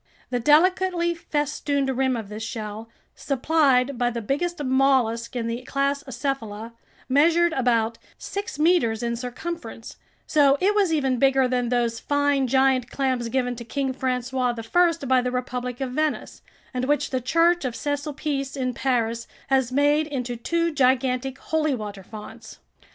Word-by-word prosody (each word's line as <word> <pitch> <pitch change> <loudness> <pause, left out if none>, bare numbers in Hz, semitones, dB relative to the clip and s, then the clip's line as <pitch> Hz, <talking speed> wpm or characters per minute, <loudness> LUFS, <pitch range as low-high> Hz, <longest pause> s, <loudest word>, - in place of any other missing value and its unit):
The 245 - 0
delicately 345 +5 +3
festooned 290 -4 -1
rim 260 0 +1
of 220 -3 -6
this 210 +2 -7
shell, 220 -1 -6 0.2
supplied 275 -2 +1
by 245 -1 +2
the 235 -1 -4
biggest 295 +8 -2
mollusk 260 -3 +2
in 235 -2 -2
the 230 +1 -3
class 275 +2 -1
Acephala, 235 -4 -4 0.3
measured 330 +5 +4
about 235 -4 +1 0.2
six 400 -6 -5
meters 300 -9 +2
in 235 0 -1
circumference; 245 -1 -6 0.3
so 285 -2 +4
it 400 +3 +3
was 400 -5 +2
even 270 -5 +1
bigger 270 -1 +4
than 250 -1 0
those 235 -2 0
fine 285 -2 +1
giant 265 -1 +2
clams 255 -4 -1
given 250 0 -1
to 235 - -6
King 265 +2 -2
François 250 -2 -2
I 335 -4 +3
by 260 -1 +3
the 250 - -1
Republic 250 -1 -3
of 265 -2 -3
Venice, 305 +3 -2 0.3
and 250 0 -1
which 290 +2 0
the 260 -1 -1
Church 335 +6 +3
of 250 -3 -3
Saint 285 +3 -2
Sulpice 285 -2 -3
in 255 -1 -1
Paris 235 -3 -1 0.2
has 265 -2 +2
made 290 +3 +3
into 250 -4 -3
two 335 +8 0
gigantic 260 -1 +1
holy 310 -3 0
water 210 -3 -7
fonts. 210 +2 -11
265 Hz, 155 wpm, -24 LUFS, 240-290 Hz, 0.3 s, measured